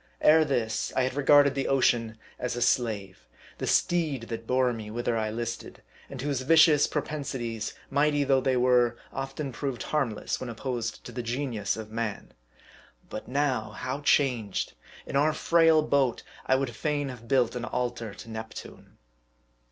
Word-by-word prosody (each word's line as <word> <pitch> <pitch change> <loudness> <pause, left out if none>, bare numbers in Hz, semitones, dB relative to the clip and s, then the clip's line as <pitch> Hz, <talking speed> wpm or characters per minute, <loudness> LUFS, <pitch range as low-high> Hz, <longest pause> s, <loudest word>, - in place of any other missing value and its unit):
Ere 160 +1 +6
this, 115 -7 -1
I 130 - +3
had 130 - -1
regarded 145 0 +5
the 135 -1 -2
ocean 115 -4 +2 0.2
as 125 -1 -2
a 120 - -4
slave, 100 - -1 0.3
the - - -3
steed 155 -8 +1
that 115 -1 -5
bore 125 -1 +2
me 110 -2 -7
whither 120 +1 -1
I 110 -1 -1
listed, 115 +1 -5 0.3
and 135 - -8
whose 140 -1 -1
vicious 155 +1 +6
propensities, 130 -7 -4 0.2
mighty 145 0 +2
though 135 -1 +3
they 130 -1 +1
were, 125 -1 +3 0.2
often 135 +1 -4
proved 130 -1 -4
harmless, 130 -9 -1
when 130 - -5
opposed 120 0 -4
to - - -9
the 125 +1 -4
genius 115 -4 -2
of 110 -1 -8
man. 110 -2 -4 0.8
But 110 - -6
now, 130 -5 0
how 130 +6 -4
changed! 125 - +1 0.3
In - - -6
our 150 +3 +3
frail 165 -1 +4
boat, 140 -5 +1 0.2
I 130 - +4
would 130 -4 -2
fain 145 0 -1
have 120 -2 -10
built 125 -3 +2
an 120 -1 -3
altar 120 -4 -3
to - - -11
Neptune. 110 0 -9
125 Hz, 160 wpm, -27 LUFS, 115-140 Hz, 0.8 s, Ere